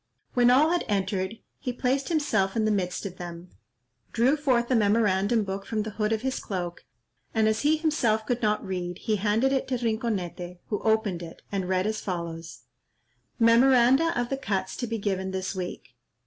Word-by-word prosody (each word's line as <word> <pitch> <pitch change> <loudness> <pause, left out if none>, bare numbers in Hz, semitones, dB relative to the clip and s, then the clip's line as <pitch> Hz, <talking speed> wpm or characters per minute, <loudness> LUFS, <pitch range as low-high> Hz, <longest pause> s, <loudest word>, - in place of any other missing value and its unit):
When 245 -1 +5
all 290 +6 +5
had 350 - +1
entered, 195 0 -1 0.2
he 250 - -3
placed 260 +2 -1
himself 290 - +1
in 220 -1 +1
the 215 - +2
midst 185 -1 -1
of 185 -2 -6
them, 175 0 -8 0.6
drew 245 +5 +3
forth 260 -5 +1
a - - +4
memorandum 210 0 +3
book 195 0 -4
from 215 0 -2
the 220 - -5
hood 210 +1 -1
of 220 +1 -1
his 265 0 -1
cloak, 175 -3 -5 0.5
and 220 -1 +3
as 220 0 +1
he 305 +2 +3
himself 250 -9 +1
could 245 +2 -1
not 210 -1 +1
read, 180 -2 -4
he 215 +1 -1
handed 220 +7 +2
it 265 - 0
to 255 - 0
Rinconete, 210 -6 -2
who 205 - -1
opened 220 -5 +1
it, 165 -1 -10
and 190 -2 -2
read 185 0 +1
as 215 0 -2
follows:— 170 -3 -5 0.8
"Memoranda 255 +6 +5
of 240 0 -1
the 270 - -1
cuts 195 -8 -2
to 245 - -3
be 225 0 -2
given 190 -2 -2
this 190 0 -3
week. 180 -8 -6
215 Hz, 190 wpm, -27 LUFS, 190-245 Hz, 0.8 s, When